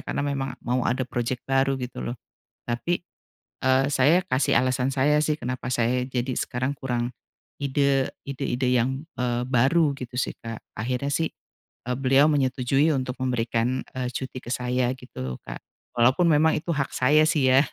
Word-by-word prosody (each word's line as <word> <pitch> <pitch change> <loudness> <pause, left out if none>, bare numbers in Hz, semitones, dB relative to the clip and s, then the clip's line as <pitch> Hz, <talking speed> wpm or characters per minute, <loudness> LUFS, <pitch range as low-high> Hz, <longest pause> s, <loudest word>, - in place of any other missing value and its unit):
karena - - -2
memang 135 -2 -2
mau 125 +1 +1
ada 130 +1 0
proyek 120 +1 -2
baru 135 0 +2
gitu 125 0 -5
loh. - - -8 0.5
Tapi, 120 +9 -1 0.6
eee, 130 0 +3
saya 145 +6 +4
kasih 130 -4 +2
alasan 130 +1 +1
saya 145 +3 +3
sih 155 0 +1
kenapa 125 -3 -4
saya 120 +2 +1
jadi 130 0 -2
sekarang 130 +3 -2
kurang 120 -2 -2 0.5
ide 140 -1 +2 0.2
ide-ide 130 -2 -1
yang, 130 +3 +1 0.2
eee, 120 -1 0
baru 140 +5 +3
gitu 125 0 -8
sih - - -1
Kak, 115 -1 -5 0.2
akhirnya 125 +5 -1
sih, 160 +2 0 0.6
e - - -1
beliau 135 +2 +4
menyetujui 135 +1 +2
untuk 130 -1 -2
memberikan, 120 0 0 0.2
eee, 125 -1 -2
cuti 130 0 -5
ke - - -9
saya 125 0 0
gitu 125 - -12
loh, 65 -1 -4
Kak. - - -6 0.4
Walaupun 130 +9 +4
memang 155 +1 +4
itu 170 - -4
hak 140 -2 -1
saya 150 +5 +4
sih 145 -4 +2
ya, 135 - +7
130 Hz, 165 wpm, -25 LUFS, 125-140 Hz, 0.6 s, ya